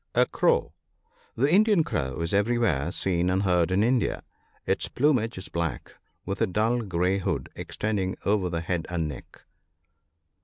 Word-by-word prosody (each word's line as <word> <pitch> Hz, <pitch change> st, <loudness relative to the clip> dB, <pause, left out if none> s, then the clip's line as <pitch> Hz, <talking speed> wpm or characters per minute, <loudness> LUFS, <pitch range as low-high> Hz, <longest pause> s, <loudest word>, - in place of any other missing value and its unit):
A -, -, +5 dB
crow. -, -, +1 dB, 0.3 s
— -, -, -36 dB
The 135 Hz, +4 st, +2 dB
Indian 205 Hz, -3 st, +5 dB
crow 70 Hz, -, -3 dB
is 85 Hz, +3 st, -2 dB
everywhere 100 Hz, -, +1 dB
seen 90 Hz, -2 st, 0 dB
and 95 Hz, +2 st, +1 dB
heard 90 Hz, -3 st, +2 dB
in 95 Hz, +3 st, +2 dB
India. 125 Hz, +1 st, +1 dB, 0.4 s
Its -, -, 0 dB
plumage 125 Hz, -6 st, +1 dB
is 95 Hz, -, -6 dB
black, 85 Hz, -2 st, -4 dB, 0.3 s
with 95 Hz, +1 st, -4 dB
a -, -, +3 dB
dull 110 Hz, +6 st, +1 dB
grey 95 Hz, -1 st, 0 dB
hood 95 Hz, -, -2 dB
extending 100 Hz, -3 st, -2 dB
over 100 Hz, -3 st, +1 dB
the 85 Hz, -1 st, -2 dB
head 85 Hz, -1 st, -2 dB
and 85 Hz, -3 st, -1 dB
neck. 70 Hz, -3 st, -10 dB
95 Hz, 160 wpm, -26 LUFS, 85-115 Hz, 0.4 s, A